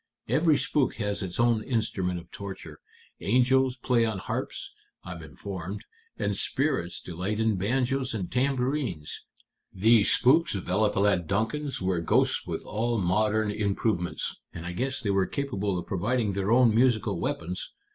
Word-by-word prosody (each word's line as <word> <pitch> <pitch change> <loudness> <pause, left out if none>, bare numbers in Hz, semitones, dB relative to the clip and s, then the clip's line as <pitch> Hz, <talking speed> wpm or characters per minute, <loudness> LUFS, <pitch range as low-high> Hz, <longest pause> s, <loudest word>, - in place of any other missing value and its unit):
Every 155 -2 +3
spook 140 -4 0
has 105 -2 -2
its 95 0 -4
own 120 -2 +3
instrument 105 -7 -1
of 85 +1 -15
torture. 100 -1 -8 0.4
Angels 130 +3 +3
play 120 -1 +2
on 110 -3 -1
harps, - - -4 0.3
I'm 90 -2 -7
informed, 90 +6 -7 0.3
and - - -1
spirits 135 - -1
delight 90 +5 -4
in 110 -1 +2
banjos 130 +5 0
and 95 -5 -4
tambourines. 125 - -1 0.5
These 110 +2 +4
spooks 155 +3 +4
of 95 - -5
Eliphalet 100 -2 +2
Duncan's 115 +6 -1
were 90 -2 +1
ghosts 85 - +2
with - - -4
all 115 +3 -1
modern 105 +3 +1
improvements, 100 -5 -1
and 85 -1 -8
I 90 - -3
guess 130 +8 -2
they 105 -5 0
were 95 -1 +2
capable 105 -9 -2
of 90 - -4
providing 105 +2 0
their 100 +2 -1
own 120 -2 +5
musical 110 -5 +2
weapons. 90 +2 -3
105 Hz, 145 wpm, -27 LUFS, 95-125 Hz, 0.5 s, own